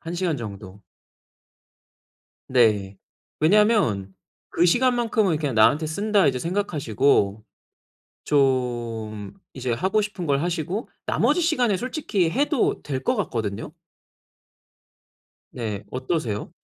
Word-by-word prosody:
1 170 -2 -6
시간 175 -4 -1
정도. 100 -3 -9 1.7
네. 105 -6 +2 0.4
왜냐하면 160 - +3 0.3
'그 170 - +1
시간만큼은 230 -3 +2
그냥 145 -5 -2
나한테 145 +8 +4
쓴다.' 200 +3 +1
이제 130 -2 +1
생각하시고 140 - 0 0.8
좀 120 -7 -1 0.2
이제 130 -2 -3
하고 190 - +1
싶은 205 -4 -5
걸 140 -2 +1
하시고 175 +5 -3 0.2
나머지 - - +2
시간에 250 - +2
솔직히 240 - -1
해도 285 +1 +1
될 135 -2 -4
것 255 - +1
같거든요. 115 - -3 1.8
네 110 -5 -4
어떠세요? 130 -5 -3
150 Hz, 225 characters per minute, -24 LUFS, -, 1.8 s, 나한테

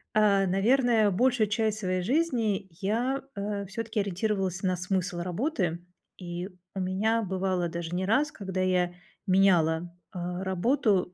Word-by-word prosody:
А, 200 -2 +4
наверное, 220 +3 +3
большую 235 +2 +2
часть 215 0 0
своей 185 -2 -1
жизни 230 - 0
я, 240 +7 0
э, 200 0 -3
всё-таки 220 +1 -2
ориентировалась 195 -1 -1
на 185 -2 +1
смысл 180 0 -2
работы, 180 - -2 0.3
и 175 0 -5 0.3
у - - -2
меня 210 +5 +1
бывало 185 -2 -1
даже 170 0 -4
не 185 +1 -1
раз, 280 +9 +2
когда 190 -2 -5
я 180 -1 +1 0.3
меняла, 175 -3 +3 0.2
а, 180 0 -4
работу 190 -1 +1
195 Hz, 135 wpm, -28 LUFS, 180-220 Hz, 0.3 s, А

